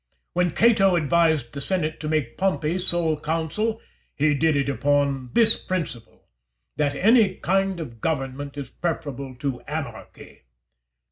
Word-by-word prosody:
When 180 0 +2
Cato 195 -1 +4
advised 160 -6 +2
the 140 - -5
senate 160 -1 -2
to 150 - -4
make 150 -7 -1
Pompey 185 -3 0
sole 175 -3 +2
consul, 165 +9 -2 0.4
he 150 +1 +2
did 155 +2 +2
it 140 -1 +1
upon 140 -2 0
this 225 -1 +5
principle, 150 -11 -5 0.5
that 145 -1 0
any 210 - +4
kind 195 0 0
of 115 -8 -8
government 140 -2 -3
is 140 - -6
preferable 140 -6 -4
to 135 -1 -4
anarchy. - - -7
155 Hz, 135 wpm, -24 LUFS, 140-180 Hz, 0.5 s, this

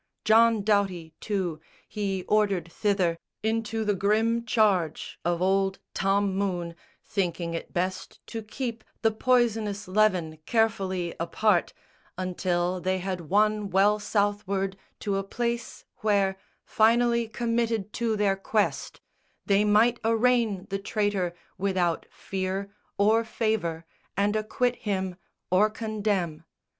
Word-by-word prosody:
John 225 0 +5
Doughty, 195 -6 0
too, 185 -7 -2 0.3
He 195 -3 -2
ordered 195 -6 +1
thither, 185 -4 +1 0.2
into 220 0 -1
the 205 - +2
grim 220 +4 +1
charge 200 -8 +1
Of 175 +1 0
old 195 0 +2 0.2
Tom 195 0 +1
Moone, 180 -4 -1 0.3
thinking 170 -3 -2
it 165 - -5
best 185 +1 -3
to 225 - -5
keep 230 +1 -5 0.2
The 225 - +4
poisonous 220 -4 +1
leaven 185 -5 +2
carefully 195 -6 0
apart 175 +2 +1 0.4
Until 180 -1 -1
they 185 +1 0
had 185 -3 -4
won 210 +1 +2
well 200 +3 +4
Southward, 200 -2 0 0.3
to 200 -2 0
a 195 - -1
place 235 +3 -3
Where, 200 -4 +2 0.3
finally 235 +1 +3
committed 230 -2 -1
to 225 -2 +1
their 205 -2 +2
quest, 205 +2 -1 0.4
They 200 +1 +3
might 220 +3 +4
arraign 225 -3 +2
the 195 - -1
traitor 200 -4 -1 0.2
without 185 -4 0
fear 195 +1 -4 0.2
Or 220 +3 +4
favour, 215 -8 -1 0.3
and 205 +1 +2
acquit 245 +3 0
him 190 -3 -2 0.3
or 200 +4 +5
condemn. 210 -7 -2
200 Hz, 120 wpm, -27 LUFS, 185-220 Hz, 0.4 s, John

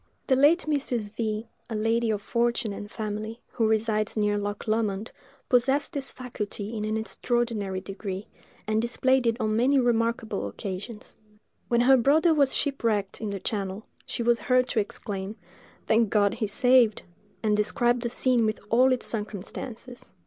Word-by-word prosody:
The 265 - +3
late 295 +7 +4
Mrs. 250 -8 -1
V——, 220 -1 -2 0.2
a 225 - -3
lady 225 +2 +1
of 210 -2 -1
fortune 235 -2 0
and 205 +1 -7
family, 215 +2 -5
who 225 -3 +1
resides 220 0 0
near 210 -1 +2
Loch 205 +1 -4
Lomond, 215 -1 -1 0.4
possessed 265 +3 +2
this 275 -2 -4
faculty 220 -3 -5
in 215 -1 -2
an 215 +1 -1
extraordinary 220 -4 -1
degree, 195 0 -6 0.4
and 215 +1 +1
displayed 255 +1 +2
it 230 +1 +1
on 215 -2 0
many 260 +5 +3
remarkable 230 - +1
occasions. 200 - -7 0.5
When 235 0 +3
her 265 +2 +6
brother 310 +7 +4
was 280 -3 +3
shipwrecked 225 -9 -1
in 215 - -2
the 200 -1 -4
channel, 195 +1 -3 0.2
she 235 - -3
was 235 0 +3
heard 250 +3 +3
to 225 - +1
exclaim, 200 -1 -4 0.5
"Thank 220 -1 +3
God, 205 -1 +3
he 225 - -2
is 205 - -4
saved!" 245 -2 +4 0.4
and 210 -1 +3
described 240 +3 +2
the 235 - -2
scene 250 0 +2
with 215 -1 0
all 255 +3 +5
its 255 - 0
circumstances. 220 +3 -6
225 Hz, 165 wpm, -27 LUFS, 210-245 Hz, 0.5 s, her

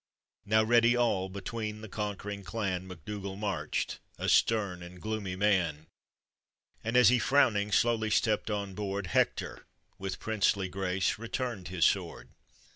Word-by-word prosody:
Now 110 +1 +4
ready 120 +1 +4
all, 100 -6 +1
between 105 +2 -5
the 110 - -7
conquering 105 -1 -4
clan 95 -2 -3
Mac. 90 -5 -11
Dougall 100 -2 -5
marched, 95 -7 -2 0.2
a - - -1
stern 100 -6 +2
and 90 +1 -10
gloomy 105 -2 -3
man, 90 -6 +1 1.0
And 115 +2 +1
as 125 -3 +8
he, 125 0 +4
frowning, 110 -6 +3
slowly 110 0 +2
stepped 110 0 +1
on 100 -2 -2
board, 100 0 -3
Hector, 85 - -1 0.3
with 95 -1 -4
princely 100 -3 +1
grace, 95 0 -1
returned 115 -4 -3
his 85 -3 +1
sword. - - 0
100 Hz, 140 wpm, -30 LUFS, 95-110 Hz, 1.0 s, as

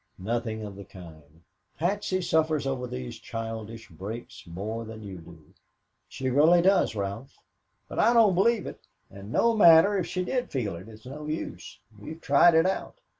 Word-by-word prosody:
"Nothing 110 +2 -3
of 100 -2 -8
the 100 - -9
kind. 80 -4 -15 0.3
Patsy 185 +1 -1
suffers 155 -3 +1
over 130 -2 -2
these 65 - -7
childish 115 0 -7
breaks 100 +6 -9
more 105 +7 -5
than 110 -1 -9
you 95 -3 -8
do. 80 -2 -16 0.6
She 130 -1 -3
really 155 +6 +5
does, 190 - +3
Ralph." 100 +6 -5 0.5
"But - - -6
I - - +5
don't 225 -5 +5
believe 220 +5 +2
it. - - -10 0.2
And 100 +2 -10
no 230 - +2
matter 175 0 +7
if 175 - -3
she 180 +1 -3
did 250 +4 -2
feel 110 -9 -3
it, 90 +6 -11
it's 110 +1 -14
no 150 +4 -8
use. 150 - -6 0.2
We've 155 +11 -9
tried 165 +3 +5
it 160 +1 +5
out." 190 - -3
120 Hz, 175 wpm, -27 LUFS, 100-165 Hz, 0.6 s, matter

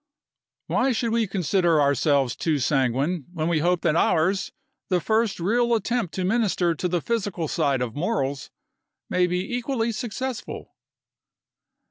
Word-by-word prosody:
Why 255 +1 +1
should 230 0 -1
we 230 -1 +1
consider 180 -3 +2
ourselves 140 -2 +2
too 160 -3 0
sanguine 135 +4 0
when 160 -2 -2
we 170 -2 +2
hope 175 +2 +1
that 155 - +1
ours, 180 +3 +2 0.4
the 180 -2 +2
first 220 +2 0
real 235 +6 +2
attempt 225 -3 -1
to 185 - -2
minister 190 -5 +1
to 170 +3 -2
the 175 -2 -1
physical 200 -8 -2
side 140 -5 0
of 115 -3 -4
morals, 145 -6 -2 0.6
may 180 0 +3
be 180 +6 -2
equally 240 -2 -1
successful?" 245 +2 -5
180 Hz, 140 wpm, -24 LUFS, 155-225 Hz, 0.6 s, may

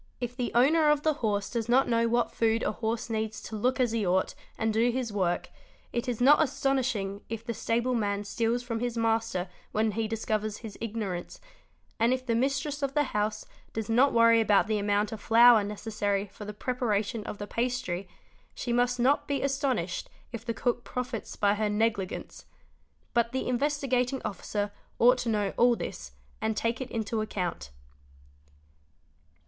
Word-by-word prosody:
If 245 0 -4
the 245 -2 -2
owner 300 +6 +5
of 295 -1 +2
the 310 - +3
horse 205 -3 0
does 235 -2 -2
not 260 +3 +4
know 230 -1 +2
what 240 +1 +1
food 225 0 +1
a - - +1
horse 225 +1 -2
needs 220 -1 -2
to 220 - -6
look 250 +5 0
as 245 -3 +2
he 225 -2 0
ought 185 0 +1 0.2
and 220 -1 0
do 230 +3 +3
his 240 -3 -2
work, 185 -4 -1 0.4
it 240 +1 -1
is 240 - -2
not 285 +5 +6
astonishing 255 -8 0
if 225 0 -5
the 235 - -2
stable 235 +3 0
man 205 -3 0
steals 230 +4 -1
from 230 -2 -3
his 240 0 -2
master 225 -4 0 0.3
when 215 0 +2
he 220 +2 -1
discovers 215 -1 -2
his 210 - -7
ignorance; 205 -6 -4 0.6
and 230 +3 +4
if 255 0 -3
the 235 - 0
mis 270 +4 +2
tress 290 +1 -5
of 275 0 -2
the 295 - +4
house 210 0 -1 0.3
does 225 0 -3
not 255 +5 +5
worry 230 -1 +5
about 210 -2 +4
the 215 0 0
amount 205 +1 +1
of 220 -2 -6
flour 230 -1 +7
necessary 205 -1 -2
for 210 +1 -11
the 210 - -5
preparation 225 -2 -1
of - - -5
the 205 - -5
pastry, 230 -5 -2 0.5
she 240 - -2
must 245 +1 +2
not 265 +4 +2
be 280 -1 -1
astonished 265 - -1 0.2
if 230 -1 -6
the 235 - -2
cook 245 -1 -1
profits 250 -2 -5
by 200 -1 +3
her 210 0 0
negligence; 210 -3 -2 0.7
but 235 -1 +2
the 260 - -2
Investigating 260 -1 0
Officer 205 +1 -3 0.3
ought 250 +2 +5
to 240 - -2
know 205 -3 0
all 240 0 +5
this - - -6 0.3
and 220 0 -1
take 230 +3 -1
it 260 - -5
into 220 -1 -2
account. 180 - -3
230 Hz, 180 wpm, -28 LUFS, 210-245 Hz, 0.7 s, flour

